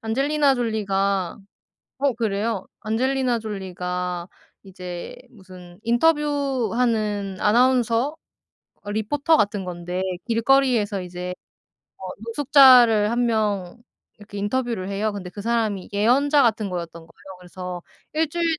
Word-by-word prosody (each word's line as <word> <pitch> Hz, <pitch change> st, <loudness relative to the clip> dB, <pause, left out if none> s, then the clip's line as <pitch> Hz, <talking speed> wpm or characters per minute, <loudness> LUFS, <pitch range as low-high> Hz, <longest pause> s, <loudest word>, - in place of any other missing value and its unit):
안젤리나 275 Hz, +4 st, +1 dB
졸리가 200 Hz, -5 st, -1 dB, 0.6 s
어? 275 Hz, -2 st, +1 dB
그래요? 220 Hz, -2 st, -2 dB, 0.2 s
안젤리나 250 Hz, +2 st, 0 dB
졸리가 180 Hz, -3 st, -4 dB, 0.3 s
이제 180 Hz, -2 st, -8 dB
무슨 185 Hz, -4 st, -14 dB
인터뷰 280 Hz, -1 st, +1 dB
하는 210 Hz, -5 st, -1 dB
아나운서 245 Hz, +4 st, +2 dB, 0.7 s
어 205 Hz, -, -6 dB
리포터 280 Hz, +9 st, +1 dB
같은 205 Hz, -3 st, 0 dB
건데 180 Hz, 0 st, -5 dB, 0.3 s
길거리에서 230 Hz, -4 st, +2 dB
이제 180 Hz, 0 st, -6 dB, 0.7 s
뭐 190 Hz, -, -7 dB, 0.2 s
노숙자를 245 Hz, -5 st, +6 dB
1 240 Hz, +1 st, +1 dB
명 210 Hz, -4 st, -1 dB, 0.4 s
이렇게 205 Hz, 0 st, -12 dB
인터뷰를 225 Hz, -2 st, -2 dB
해요. 210 Hz, +2 st, -1 dB
근데 190 Hz, -3 st, -7 dB
그 205 Hz, -, -9 dB
사람이 220 Hz, -4 st, -1 dB
예언자 275 Hz, +7 st, +3 dB
같은 220 Hz, -4 st, +1 dB
거였던 170 Hz, -2 st, -6 dB
거예요. 185 Hz, +3 st, -14 dB
그래서 180 Hz, 0 st, -8 dB, 0.3 s
"1 315 Hz, 0 st, +1 dB
주일 340 Hz, +2 st, -2 dB
215 Hz, 270 characters per minute, -23 LUFS, 190-250 Hz, 0.7 s, 노숙자를